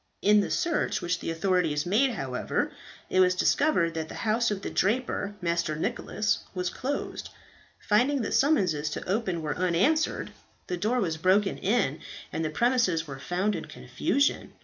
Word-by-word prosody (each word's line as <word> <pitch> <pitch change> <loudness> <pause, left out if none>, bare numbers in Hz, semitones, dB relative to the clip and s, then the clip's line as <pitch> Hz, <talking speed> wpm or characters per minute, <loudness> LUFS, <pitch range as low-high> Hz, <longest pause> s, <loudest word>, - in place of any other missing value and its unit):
In 210 +1 +6
the 200 - 0
search 340 -3 0
which 175 0 -1
the - - -4
authorities 165 -3 +1
made, 235 +8 +2
however, 130 -9 -2 0.4
it 185 - +1
was 180 0 +5
discovered 185 - +2
that 160 -1 -4
the - - -8
house 225 +2 +2
of 200 -2 -3
the - - -4
draper, 205 -1 0
Master 170 -2 0
Nicholas, 210 +6 -1 0.2
was 180 -1 -1
closed. 280 +3 -4 0.5
Finding 250 +5 +2
that - - -3
summonses 180 - +2
to - - -6
open 185 -4 -1
were 150 -1 -2
unanswered, 185 - +1 0.3
the 180 - -3
door 220 +7 0
was 165 -7 -1
broken 195 +4 +2
in, 190 - +1 0.3
and 160 - -1
the 155 - -1
premises 230 -4 +1
were 135 -3 -8
found 185 +8 -1
in - - -5
confusion. 280 +1 -1
185 Hz, 165 wpm, -27 LUFS, 165-230 Hz, 0.5 s, In